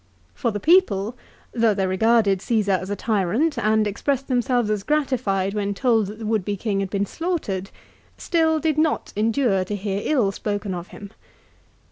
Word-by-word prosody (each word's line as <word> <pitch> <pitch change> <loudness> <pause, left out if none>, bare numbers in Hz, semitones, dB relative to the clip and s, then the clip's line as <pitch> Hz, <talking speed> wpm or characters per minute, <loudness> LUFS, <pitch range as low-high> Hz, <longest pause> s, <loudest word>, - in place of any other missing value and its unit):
For 235 - -1
the 205 -2 -3
people, 250 - +3 0.4
though 225 -3 +2
they 195 -1 0
regarded 200 +1 +3
Csesar 200 -3 +1
as 185 +3 -7
a 205 - -1
tyrant, 225 - 0
and 215 -1 +2
expressed 270 +6 -1
themselves 245 -3 +1
as 210 -2 -1
gratified 235 -9 0
when 200 -1 -2
told 225 -3 +2
that 210 +2 -8
the 225 - -7
would 215 -2 0
be 205 +1 -3
king 200 0 -1
had 195 -1 -2
been 200 +1 -1
slaughtered, 215 - -3 0.5
still 320 -2 +1
did 310 -1 0
not 310 -1 0
endure 215 -2 +1
to 205 +3 -4
hear 200 0 -3
ill 245 -10 +2
spoken 205 0 -3
of 175 0 -6
him. 200 -1 -11
215 Hz, 175 wpm, -23 LUFS, 195-250 Hz, 0.5 s, people